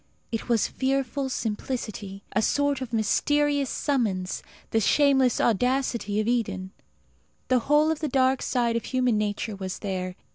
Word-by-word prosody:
It 225 Hz, +1 st, -4 dB
was 230 Hz, -3 st, +3 dB
fearful 270 Hz, +1 st, -1 dB
simplicity 210 Hz, -4 st, -4 dB
a 210 Hz, -, +1 dB
sort 285 Hz, +4 st, +1 dB
of 255 Hz, -3 st, -5 dB
mysterious 285 Hz, +5 st, +1 dB
summons 210 Hz, -10 st, -1 dB, 0.3 s
the 225 Hz, -, +3 dB
shameless 265 Hz, +2 st, +3 dB
audacity 235 Hz, -2 st, +1 dB
of 215 Hz, -, 0 dB
Eden. 200 Hz, -6 st, -1 dB, 0.8 s
The 255 Hz, -1 st, +4 dB
whole 300 Hz, +2 st, +5 dB
of 320 Hz, -, -2 dB
the 305 Hz, -, -2 dB
dark 260 Hz, 0 st, +2 dB
side 235 Hz, -2 st, 0 dB
of 230 Hz, -, -2 dB
human 250 Hz, -4 st, +1 dB
nature 210 Hz, +1 st, -2 dB
was 190 Hz, -1 st, -5 dB
there. 185 Hz, -2 st, -4 dB
240 Hz, 145 wpm, -26 LUFS, 210-270 Hz, 0.8 s, whole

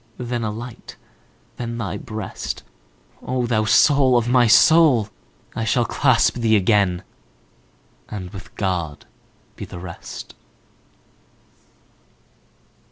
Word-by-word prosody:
Then 120 Hz, -1 st, -3 dB
a 110 Hz, -, -1 dB
light, 115 Hz, +3 st, -9 dB, 0.6 s
then 115 Hz, -1 st, -5 dB
thy 110 Hz, -5 st, -4 dB
breast,O 110 Hz, -, -7 dB
thou 110 Hz, -2 st, +1 dB
soul 135 Hz, +2 st, +4 dB
of 120 Hz, 0 st, 0 dB
my 125 Hz, -1 st, +4 dB
soul! 125 Hz, -1 st, +5 dB, 0.5 s
I 115 Hz, -, -2 dB
shall 120 Hz, +2 st, +1 dB
clasp 130 Hz, -3 st, +2 dB
thee 115 Hz, -2 st, +2 dB
again, 100 Hz, -3 st, +2 dB, 1.1 s
And 95 Hz, -4 st, -7 dB
with 95 Hz, +1 st, -11 dB
God 90 Hz, -7 st, -3 dB, 0.5 s
be -, -, -8 dB
the -, -, -9 dB
rest! 85 Hz, -1 st, -9 dB
115 Hz, 100 wpm, -21 LUFS, 100-120 Hz, 1.1 s, soul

